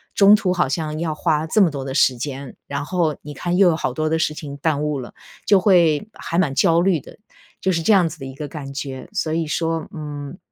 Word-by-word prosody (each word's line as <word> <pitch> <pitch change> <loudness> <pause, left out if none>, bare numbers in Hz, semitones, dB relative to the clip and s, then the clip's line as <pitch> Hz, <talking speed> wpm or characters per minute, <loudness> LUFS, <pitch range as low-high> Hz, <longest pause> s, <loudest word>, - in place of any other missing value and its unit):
中 205 +1 +7
途 185 -3 0
好 180 - +1
像 155 +1 -2
要 160 -2 -2
花 155 -1 0
这 210 +6 +3
么 170 -5 +4
多 135 -2 -5
的 135 - -4
时 130 -3 +3
间， 135 0 -6
然 140 - -3
后 165 -4 0
你 150 0 -9
看 175 +5 -2
又 195 -2 +6
有 165 - +2
好 130 - -2
多 155 +2 -1
的 160 - +1
事 155 - 0
情 145 -2 -8
耽 150 0 0
误 150 -2 -1
了， 120 - -9 0.3
就 200 -2 +5
会 175 -1 +3
还 170 - -4
蛮 150 -7 +2
焦 165 +5 +4
虑 180 -4 +2
的， - - -14 0.5
就 190 - +1
是 165 -2 0
这 210 +6 +4
样 180 -4 +4
子 155 - -11
的 135 - -7
一 135 0 -8
个 150 +1 -6
感 140 -3 -7
觉。 135 -1 -6
所 160 -6 -1
以 165 -1 -1
说， 165 +1 -1
嗯， 150 +1 -7
155 Hz, 270 characters per minute, -21 LUFS, 145-170 Hz, 0.5 s, 中